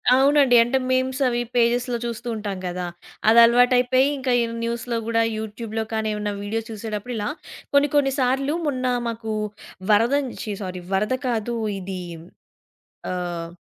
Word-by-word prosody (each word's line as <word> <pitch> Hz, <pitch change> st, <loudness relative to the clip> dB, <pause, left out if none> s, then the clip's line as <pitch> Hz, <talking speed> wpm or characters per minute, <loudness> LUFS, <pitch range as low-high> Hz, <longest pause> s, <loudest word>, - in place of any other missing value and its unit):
అవునండి. 275 Hz, -1 st, +5 dB
అంటే, 240 Hz, +3 st, 0 dB
మీమ్స్ 260 Hz, +1 st, 0 dB
అవి 240 Hz, -1 st, 0 dB
పేజెస్‌లో 240 Hz, +1 st, +2 dB
చూస్తూ 235 Hz, 0 st, -5 dB
ఉంటాం 205 Hz, -3 st, -4 dB
గదా! 180 Hz, 0 st, -3 dB, 0.4 s
అదలవాటయిపోయి 245 Hz, +3 st, +5 dB
ఇంకా 260 Hz, -1 st, -1 dB
ఈ -, -, +2 dB, 0.2 s
న్యూస్‌లో 235 Hz, 0 st, -2 dB
గూడా 230 Hz, 0 st, +2 dB
యూట్యూబ్‌లో 220 Hz, +1 st, -4 dB
కానీ, 220 Hz, 0 st, 0 dB
ఏవన్నా 210 Hz, 0 st, -2 dB
వీడియో 220 Hz, +2 st, -2 dB
చూసేటప్పుడు 220 Hz, +1 st, -5 dB
ఇలా 210 Hz, -, -2 dB, 0.4 s
కొన్ని 285 Hz, +1 st, +4 dB
కొన్నిసార్లు 270 Hz, 0 st, +2 dB
మొన్న 255 Hz, -3 st, -1 dB, 0.2 s
మాకు 225 Hz, -1 st, -4 dB, 0.6 s
వరదం 245 Hz, +7 st, +3 dB
ఛి! 215 Hz, -, -4 dB
సారీ 185 Hz, -2 st, -5 dB
వరద 210 Hz, +6 st, +1 dB
కాదు 235 Hz, -1 st, -1 dB, 0.2 s
ఇది 185 Hz, 0 st, -5 dB, 1.1 s
ఆహ్, 175 Hz, -2 st, -4 dB
235 Hz, 130 wpm, -23 LUFS, 210-255 Hz, 1.1 s, అవునండి